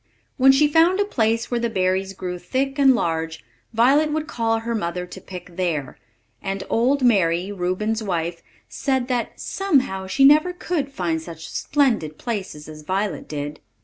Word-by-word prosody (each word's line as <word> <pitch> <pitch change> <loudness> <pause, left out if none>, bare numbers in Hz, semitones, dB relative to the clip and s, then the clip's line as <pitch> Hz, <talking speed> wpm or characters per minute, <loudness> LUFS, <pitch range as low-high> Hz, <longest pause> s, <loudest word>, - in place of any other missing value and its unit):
When 270 0 +7
she 285 +3 +4
found 330 +5 +4
a 410 - +3
place 230 - 0
where 240 - +1
the 235 0 0
berries 190 -1 0
grew 180 -1 -5
thick 270 +10 -2
and 270 -2 +6
large, 165 -5 -2 0.3
Violet 275 +7 +4
would 310 0 -1
call 230 -6 0
her 235 +1 -3
mother 180 -4 -2
to 180 +1 -11
pick 180 -1 -10
there; 165 -7 -2 0.4
and 195 0 -3
old 260 +4 +2
Mary, 185 -5 +3
Reuben's 205 +4 -1
wife, 170 -4 -2 0.3
said 265 -2 -1
that 245 -2 -2
"somehow 260 - 0
she 270 +8 +3
never 305 +5 +6
could 325 -6 -3
find 170 -9 -2
such 165 -1 -9
splendid 230 - 0
places 190 -10 -5
as 155 -1 -10
Violet 190 +5 -2
did." 145 0 -5
215 Hz, 165 wpm, -22 LUFS, 180-270 Hz, 0.4 s, When